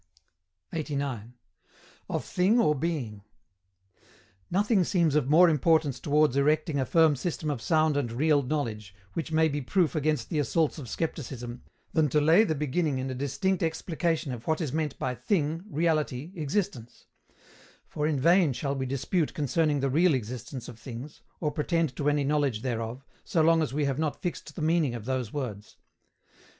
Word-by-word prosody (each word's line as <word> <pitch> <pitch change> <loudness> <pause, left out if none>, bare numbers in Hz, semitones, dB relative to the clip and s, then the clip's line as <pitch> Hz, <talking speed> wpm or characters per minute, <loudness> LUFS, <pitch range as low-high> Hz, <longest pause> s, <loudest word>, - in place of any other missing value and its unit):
89. 140 -7 -3 0.7
OF - - -2
THING 195 +7 +2
OR 150 -10 +4
BEING. 135 -9 -3 1.3
Nothing 200 +1 +2
seems 170 -4 +2
of 145 -3 +1
more 170 +4 +7
importance 155 -2 +2
towards 150 -2 +2
erecting 150 +1 +2
a 130 - -1
firm 160 -3 +4
system 155 +2 -3
of 130 -5 -4
sound 155 0 +2
and 135 -5 -1
real 145 +4 +3
knowledge, 115 -8 -3 0.2
which 160 0 -4
may 160 0 +4
be 145 -1 -2
proof 170 +5 +1
against 150 -5 0
the 155 - 0
assaults 155 +4 0
of 125 -6 -8
Scepticism, 125 -6 -4 0.3
than 155 -3 +3
to 150 - +3
lay 160 +8 +5
the 160 -8 0
beginning 150 0 0
in 130 0 -3
a - - -3
distinct 140 +8 -1
explication 160 -1 -1
of 120 -1 -9
what 160 -1 +1
is 155 -7 -3
meant 155 -3 -2
by 130 - -2
thing, 160 - -1
reality, 155 -3 0
existence; 150 - -3 0.8
for 150 0 -2
in 150 -3 0
vain 170 0 +4
shall 140 +2 -2
we 130 -1 -3
dispute 140 +5 -1
concerning 150 0 +1
the 135 - +1
real 165 +2 +4
existence 125 +1 -6
of 120 -2 -10
things, 125 +4 -9 0.2
or 150 -3 -1
pretend 160 -2 0
to 145 +1 +1
any 145 -1 +1
knowledge 140 -6 0
thereof, 120 +1 -3 0.2
so 170 - -1
long 165 0 +4
as 155 - -1
we 145 +1 0
have 135 0 -1
not 155 -2 -1
fixed 160 -4 -5
the 155 - -4
meaning 155 -6 +2
of 110 -3 -7
those 130 -3 -2
words. 110 -8 -6
150 Hz, 170 wpm, -28 LUFS, 130-160 Hz, 1.3 s, more